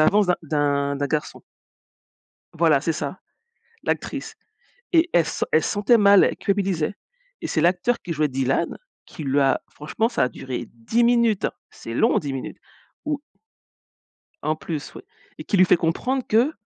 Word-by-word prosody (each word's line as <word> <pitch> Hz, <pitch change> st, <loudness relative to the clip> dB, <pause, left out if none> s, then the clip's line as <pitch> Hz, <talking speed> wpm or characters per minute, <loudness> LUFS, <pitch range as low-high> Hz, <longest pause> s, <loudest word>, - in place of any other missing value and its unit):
avances 205 Hz, +6 st, +4 dB
d'un 180 Hz, -, +2 dB
d'un 145 Hz, -2 st, 0 dB
d'un 145 Hz, +1 st, -1 dB
garçon. 150 Hz, +1 st, -3 dB, 1.1 s
Voilà, 160 Hz, -4 st, +3 dB
c'est 160 Hz, +2 st, 0 dB
ça, -, -, -5 dB, 0.7 s
l'actrice -, -, -3 dB, 0.6 s
et 335 Hz, +1 st, +4 dB
elle 170 Hz, -, +5 dB
se -, -, -4 dB
sent -, -, +1 dB
elle 155 Hz, -, +4 dB
se -, -, -1 dB
sentait 205 Hz, +4 st, +3 dB
mal, 200 Hz, -1 st, +7 dB
elle -, -, 0 dB
culpabilisait 195 Hz, -4 st, -1 dB, 0.5 s
et -, -, -4 dB
c'est 155 Hz, -, 0 dB
l'acteur 180 Hz, +8 st, +2 dB
qui 175 Hz, -, -4 dB
jouait 155 Hz, -1 st, +1 dB
Dylan 135 Hz, +4 st, -1 dB, 0.3 s
qui 155 Hz, -, -9 dB
lui 140 Hz, +1 st, +2 dB
a 135 Hz, -1 st, +2 dB
franchement 185 Hz, +9 st, -2 dB
ça -, -, +1 dB
a -, -, 0 dB
duré 125 Hz, 0 st, -6 dB
10 120 Hz, -, -1 dB
minutes, 235 Hz, -3 st, +3 dB, 0.2 s
c'est 115 Hz, -, -8 dB
long, -, -, +3 dB
10 140 Hz, -3 st, -4 dB
minutes, 130 Hz, -, -6 dB, 0.5 s
où 295 Hz, -1 st, -2 dB, 1.2 s
En 155 Hz, 0 st, 0 dB
plus, 155 Hz, -3 st, -6 dB
oui -, -, -10 dB, 0.4 s
et 155 Hz, -, -7 dB
qui 200 Hz, -, 0 dB
lui 185 Hz, -, +7 dB
fait 180 Hz, -, +4 dB
comprendre 250 Hz, +12 st, 0 dB
que 235 Hz, +8 st, +3 dB
165 Hz, 175 wpm, -23 LUFS, 145-205 Hz, 1.2 s, mal